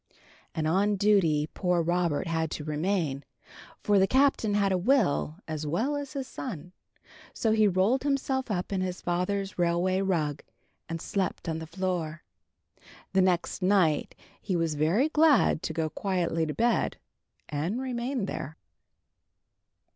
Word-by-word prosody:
And 155 -1 0
on 200 +5 +2
duty 185 -7 +3
poor 180 -2 +1
Robert 175 -2 0
had 160 -2 -1
to 150 - -5
remain, 155 -2 -1 0.6
for 205 -1 +4
the 190 - +4
Captain 260 -4 +2
had 200 -1 +2
a 185 - +2
will 180 - +2
as 155 -1 -4
well 225 - 0
as 285 -2 -5
his 270 -2 -4
son. 180 - -7 0.6
So 225 - +1
he 215 -1 +4
rolled 200 +7 +2
himself 270 -2 -1
up 190 -1 -2
in 190 - 0
his 185 -1 -3
father's 190 +3 -2
railway 175 +2 +2
rug, 155 -7 0 0.5
and 165 0 -3
slept 190 +1 -2
on 160 -1 -2
the 160 - -7
floor. 170 -2 -3 0.9
The 190 - +4
next 180 -2 0
night 185 -5 +2 0.3
he 190 - -2
was 165 -2 0
very 165 - +2
glad 310 - +4
to - - -3
go 160 0 -1
quietly 170 -2 -1
to 150 - -3
bed, 235 +1 +1 0.5
and 160 - -2
remain 250 -2 -2
there. 160 -4 -6
185 Hz, 145 wpm, -28 LUFS, 160-210 Hz, 0.9 s, for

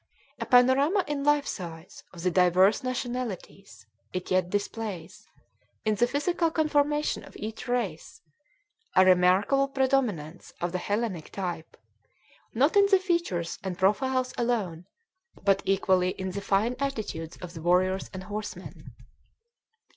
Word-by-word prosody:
A - - -4
panorama 270 +9 +4
in 290 -1 -2
life 295 0 +3
size 165 -4 -7
of 170 -2 -10
the 180 - +2
diverse 185 +4 +4
nationalities, 245 - -5 0.3
it 185 0 -4
yet 185 -1 +2
displays, 205 -3 -4 0.6
in 215 - +2
the 235 +4 +2
physical 330 +5 0
conformation 300 -1 +1
of - - -13
each 220 +3 -6
race, 230 -10 -3 0.8
a 185 - +7
remarkable 185 +9 +4
predominance 255 - -1
of 175 0 -2
the 180 - -2
Hellenic 200 -4 -2
type 175 -4 -5 0.8
not 280 - +3
in 400 0 +6
the 395 -1 +5
features 340 - -1
and 185 -2 -4
profiles 255 +7 +1
alone, 200 -8 -1 0.6
but 195 -1 +3
equally 185 -1 +2
in 190 0 -3
the 200 +2 -4
fine 210 +6 +1
attitudes 215 - -4
of 180 -1 -9
the 165 - -8
warriors 185 +2 +1
and 185 0 -7
horsemen. 210 +2 -7
205 Hz, 130 wpm, -27 LUFS, 180-260 Hz, 0.8 s, a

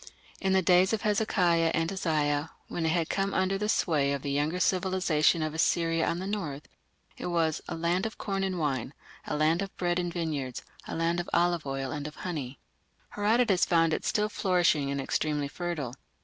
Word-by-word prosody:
In 190 -1 +1
the 190 0 +3
days 180 +3 +4
of 220 - -1
Hezekiah 185 -6 +2
and 165 +2 0
Isaiah, 150 -5 0 0.2
when 165 -2 -2
it - - +2
had 165 -1 +1
come 195 0 -1
under 190 +1 +1
the 210 +1 -1
sway 145 -9 +2
of 140 - -4
the 140 - -2
younger 150 +5 0
civilization 180 -4 +2
of 155 -1 -2
Assyria 165 0 +1
on 170 - 0
the 185 - -4
north, 165 -9 -4 0.5
it - - -4
was 165 -3 0
"a - - -4
land 170 +5 0
of 220 - -10
corn 195 -1 -2
and 190 -1 -1
wine, 140 -4 -2 0.3
a - - -2
land 160 +4 +2
of 195 -1 -6
bread 175 0 0
and 175 -1 -2
vineyards, 150 -7 -3 0.2
a - - -4
land 165 +1 0
of 175 - -4
oil 175 0 +3
olive 135 -1 -3
and 150 -1 -4
of 150 - -9
honey". 145 -8 -5 0.5
Herodotus 210 -2 +2
found 165 -2 +3
it - - -2
still 210 0 +1
flourishing 175 -8 +2
and 140 0 -2
extremely 145 +1 -1
fertile. 155 -5 -4
170 Hz, 195 wpm, -29 LUFS, 150-185 Hz, 0.5 s, days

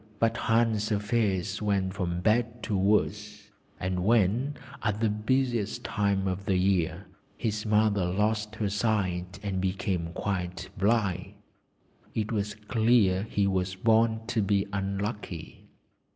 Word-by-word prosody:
But 115 +1 +2
Hans' 115 -2 +1
affairs 100 -3 0
went 100 -3 0
from 90 -3 -2
bad 115 +3 +1
to 105 - -1
worse, 100 +3 0 0.3
and 90 0 -1
when 115 +6 +2 0.3
(at 105 -1 -1
the 110 -1 +2
busiest 115 0 0
time 100 -2 0
of 95 +1 -3
the 95 - +2
year) 90 -3 +1 0.3
his 110 -1 -2
mother 105 -3 +3
lost 105 +3 0
her 105 -2 -1
sight 95 -4 -1
and 95 -2 -2
became 95 -2 -1
quite 90 -3 -3
blind 100 -3 0 0.8
it 110 0 -1
was 105 -1 -1
clear 110 -4 +3
he 100 - +1
was 95 -1 0
born 110 +2 +3
to 120 -1 0
be 100 0 +2
unlucky. 100 -3 -4
105 Hz, 130 wpm, -28 LUFS, 95-110 Hz, 0.8 s, mother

